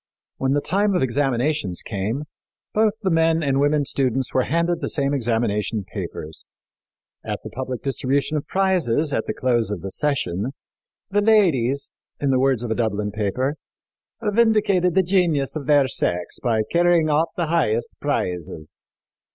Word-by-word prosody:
When 135 0 0
the 145 - +1
time 200 +5 +1
of 180 - +2
examinations 130 - 0
came, 110 +7 -3 0.5
both 215 -1 +3
the 190 - +1
men 165 0 +3
and 135 -1 +1
women 145 0 +2
students 130 -1 0
were 130 - +2
handed 170 +2 0
the - - -2
same 140 -1 0
examination 115 -4 0
papers. 75 +1 -6 0.8
At - - -4
the - - -8
public 130 -1 -5
distribution 140 +2 0
of 150 0 -3
prizes, 165 -7 +1
at - - -1
the - - -1
close 120 -5 +1
of 105 -5 -4
the 95 - -5
session, 130 - -1 0.6
"the 205 +1 +3
ladies," 145 - +3 0.3
in 140 -1 +1
the 130 - +3
words 130 -3 +2
of 120 - -3
a - - +1
Dublin 105 -3 -1
paper, 110 +8 -1 0.7
"vindicated 210 -5 +3
the 190 - +5
genius 170 -7 +1
of 145 -4 -5
their 145 -2 +5
sex 90 -7 -1
by 110 -3 +1
carrying 170 -2 +3
off 155 +3 +2
the 170 - 0
highest 135 -9 0
prizes." 90 - -3
140 Hz, 160 wpm, -22 LUFS, 115-165 Hz, 0.8 s, the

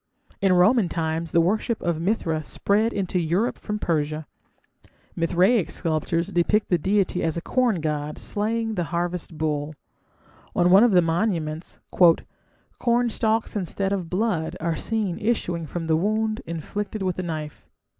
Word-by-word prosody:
In 195 -1 +4
Roman 180 +2 +4
times 160 -1 -2
the 170 - +4
worship 215 +6 0
of 170 -2 -1
Mithra 165 -5 0
spread 205 +8 +1
into 185 -3 -1
Europe 175 +8 0
from 210 -1 -3
Persia. 155 -4 -1 0.9
Mithraic 180 +5 +2
sculptures 165 0 -1
depict 210 +5 +1
the 175 - +2
deity 190 +1 +1
as 160 0 -1
a - - -2
corn 240 -9 +1
god 150 -1 -2
slaying 225 +2 -1
the 175 -4 -1
harvest 175 0 -3
bull; 150 -1 -2 0.8
on 180 0 +3
one 195 +4 +8
of 240 -4 +4
the 180 -1 +6
monuments 165 -2 -2 1.0
"cornstalks 230 -2 +1
instead 195 0 -1
of 180 -4 -3
blood 180 -4 -1
are 165 0 -1
seen 210 -2 -2
issuing 180 -7 -1
from 165 +2 -4
the 160 -1 +2
wound 215 +5 0
inflicted 195 +6 -4
with 185 -2 -1
the - - -1
knife". 155 -4 -6
180 Hz, 145 wpm, -24 LUFS, 165-210 Hz, 1.0 s, one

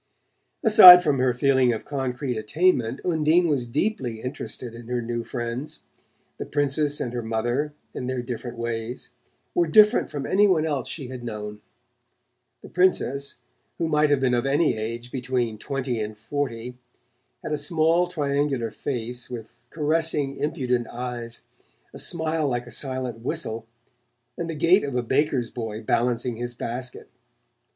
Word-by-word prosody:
Aside 185 -6 +11
from 145 -5 +1
her 130 0 +3
feeling 130 0 +3
of 110 - -4
concrete 130 -2 -3
attainment. 130 +2 +1
Undine 165 0 +3
was 135 -6 0
deeply 125 - -2
interested 125 -1 -6
in 115 0 -11
her 125 0 -1
new 120 0 -3
friends. 120 +4 -5 0.6
The - - -4
Princess 145 0 0
and 120 - -3
her 120 - -2
mother, 120 +6 -2 0.2
in 125 - -5
their 130 -1 -2
different 120 0 -6
ways, 115 +1 -4 0.4
were 170 -1 +2
different 210 +7 +5
from 145 -2 -5
any 205 +2 +4
one 165 -5 +2
else 145 -5 -2
she 135 -6 -6
had 130 -2 -7
known. 105 -2 -6 1.0
The - - -10
Princess, 140 -7 +1 0.4
who 165 - -1
might 150 -1 +3
have 145 -2 +3
been 130 -2 +1
of 120 +2 +1
any 145 +1 +2
age 115 +3 -5
between 125 -4 -2
twenty 130 -3 -3
and 105 0 -4
forty, 125 0 -4 0.6
had - - -5
a - - +2
small 165 +3 +2
triangular 140 -7 -1
face 120 +1 -4
with 115 -3 -9
caressing 150 -2 0
impudent 125 -5 -1
eyes, 120 -1 -6 0.5
a - - -7
smile 160 -2 0
like 120 -2 -2
a - - -12
silent 130 -4 -3
whistle 115 -4 -4 0.7
and 170 -1 -4
the 165 - -3
gait 170 +6 +4
of 140 -3 -3
a 125 - 0
baker's 130 -1 0
boy 110 -3 -5
balancing 120 +1 0
his 120 0 -5
basket. 125 +2 -5
130 Hz, 155 wpm, -24 LUFS, 120-150 Hz, 1.0 s, Aside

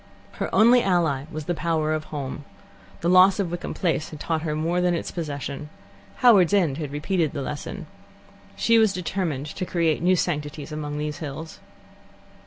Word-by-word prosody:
Her - - -4
only 240 +3 +6
ally 165 - +1
was 155 -1 -5
the 175 - 0
power 160 -2 0
of 155 0 -3
Home. 145 -1 -5 0.6
The 170 - -1
loss 185 +3 +6
of 185 -4 -1
Wickham 175 0 -5
Place 165 -3 -1
had 155 - -9
taught 160 0 -1
her 155 -2 -2
more 165 +3 0
than 180 -1 +2
its - - -4
possession. 145 -2 -5 0.6
Howards 205 -6 +6
End 165 -7 +1
had 150 -3 -4
repeated 155 +1 -1
the 140 -3 -3
lesson. 145 +2 -6 0.7
She 230 0 +4
was 220 -3 +4
determined 175 -6 -2
to 155 - -5
create 165 -4 0
new 185 +2 +4
sanctities 150 -3 -3
among 150 -1 -4
these 150 +2 -4
hills. 155 0 -7
160 Hz, 175 wpm, -24 LUFS, 150-180 Hz, 0.7 s, only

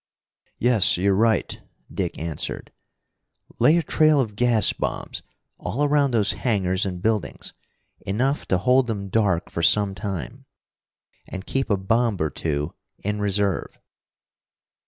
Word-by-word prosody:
"Yes, 120 -7 +3
you're 100 +2 +2
right," 110 +2 +1 0.3
Dick - - -3
answered. 80 -2 -5 0.9
"Lay 155 +3 +5
a 170 - +1
trail 155 0 +3
of 110 -6 -2
gas 115 -2 +4
bombs - - -4 0.4
all 120 +11 -2
around 145 -1 +3
those 110 -5 +2
hangars 95 -5 0
and 90 -1 -6
buildings, 110 -3 -2 0.5
enough 130 +9 -1
to 95 - +2
hold 125 +6 +3
them 100 -4 -4
dark 95 -5 0
for 85 - -3
some 100 +4 +4
time. 95 -8 -6 0.8
And 95 0 -7
keep 135 -1 -2
a 100 - +2
bomb 115 +3 0
or 80 -1 -1
two 75 -1 -2 0.3
in 105 +1 -2
reserve." 100 -2 -1
105 Hz, 135 wpm, -23 LUFS, 95-120 Hz, 0.9 s, Lay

